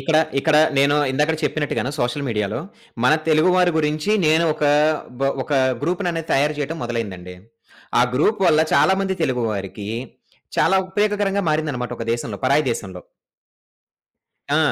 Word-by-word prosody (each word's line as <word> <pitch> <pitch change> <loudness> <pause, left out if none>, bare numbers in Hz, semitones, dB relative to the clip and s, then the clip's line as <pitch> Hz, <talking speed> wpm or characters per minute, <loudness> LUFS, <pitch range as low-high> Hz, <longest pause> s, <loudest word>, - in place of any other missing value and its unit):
ఇక్కడ 160 -2 +1 0.2
ఇక్కడ 150 +2 +2 0.2
నేను 140 +1 +4 0.2
ఇందాకడ 150 +4 +1
చెప్పినట్టుగాను 145 -3 -2
సోషల్ 130 +4 -1
మీడియా‌లో 105 0 -2 0.4
మన 125 - +5 0.2
తెలుగు 155 +3 +4
వారి 180 -1 +3
గురించి 150 +4 -1 0.2
నేను 160 +2 +3
ఒక 150 - -2 0.6
బ 135 - +1 0.2
ఒక - - -13 0.3
గ్రూప్‌‌ని 175 +3 -1
అనేది 165 -1 -5
తయారు 145 +2 +2
చేయటం 150 +3 -3
మొదలైందండి. 100 -7 -5 0.7
ఆ - - +6
గ్రూప్ 195 - +1
వల్ల 155 -2 +4
చాలా - - +4
మంది 190 -1 -1
తెలుగు 130 -5 0
వారికి 100 +1 -6 0.7
చాలా 195 - +4
ఉపయోగకరంగా 205 0 0
మారిందనమాట 145 -6 -2
ఒక 115 - -4
దేశంలో 115 -3 -4
పరాయి 140 +4 +3
దేశంలో. 95 -5 -7 1.5
ఆ! - - +3
150 Hz, 145 wpm, -21 LUFS, 120-165 Hz, 1.5 s, ఆ